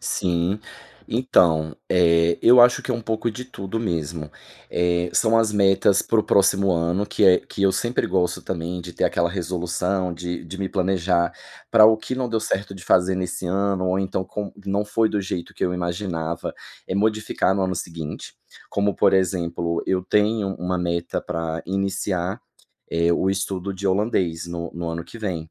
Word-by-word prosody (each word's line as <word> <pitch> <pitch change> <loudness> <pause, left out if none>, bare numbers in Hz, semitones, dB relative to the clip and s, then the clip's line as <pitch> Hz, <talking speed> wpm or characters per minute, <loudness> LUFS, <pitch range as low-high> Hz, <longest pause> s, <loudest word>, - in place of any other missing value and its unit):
Sim. 90 +3 -1 0.5
Então, 85 - +2
eh, 85 -1 +4
eu 125 +1 +7
acho 120 0 +4
que - - -4
é - - +1
um 115 - -3
pouco 115 +1 -1
de 125 +4 -7
tudo 110 -3 -5
mesmo. 80 -6 -3 0.4
Eh, 85 0 +1
são 115 0 +3
as 110 -2 +2
metas 100 -1 +4
para 115 - +1
o - - +4
próximo 100 -1 +3
ano 85 +4 0
que 105 0 0
é 90 -2 +7
que 100 - -6
eu 95 -1 +4
sempre 120 +6 0
gosto 90 -2 0
também 90 0 -4
de 90 0 -9
ter - - 0
aquela 85 0 +1
resolução, 90 +1 -2
de 90 0 -5
de 85 +3 -8
me 95 -1 -2
planejar 90 -2 +1 0.4
para 110 -2 +7
o 110 0 +7
que 110 - -5
não 130 -1 -1
deu 115 -1 0
certo 100 -1 -2
de 95 - -11
fazer 90 +1 +3
nesse 90 0 -3
ano, 95 0 0
ou 90 +1 +1
então 95 -1 -2
com 105 +1 -5
não 100 +1 0
foi 110 +2 +1
do 105 - 0
jeito 90 -3 -5
que - - -2
eu 90 - 0
imaginava, 85 -2 -3 0.3
eh, - - -2
modificar 105 -2 +1
no 95 - 0
ano 95 0 0
seguinte. 80 -3 -6 0.4
Como 100 0 0
por - - +3
exemplo, 85 -3 0
eu 95 -1 +1
tenho 105 +1 +1
uma 90 +1 -2
meta 85 -1 -2
pra 80 0 -3
iniciar, 95 -1 -2 0.5
eh, 85 +1 +2
o 95 - +1
estudo 95 0 -3
de 100 +1 -4
holandês 95 -4 0
no 85 -1 -5
no 85 0 -4
ano 85 0 -4
que 115 - -12
vem. 85 -7 -4
95 Hz, 185 wpm, -23 LUFS, 85-100 Hz, 0.5 s, eu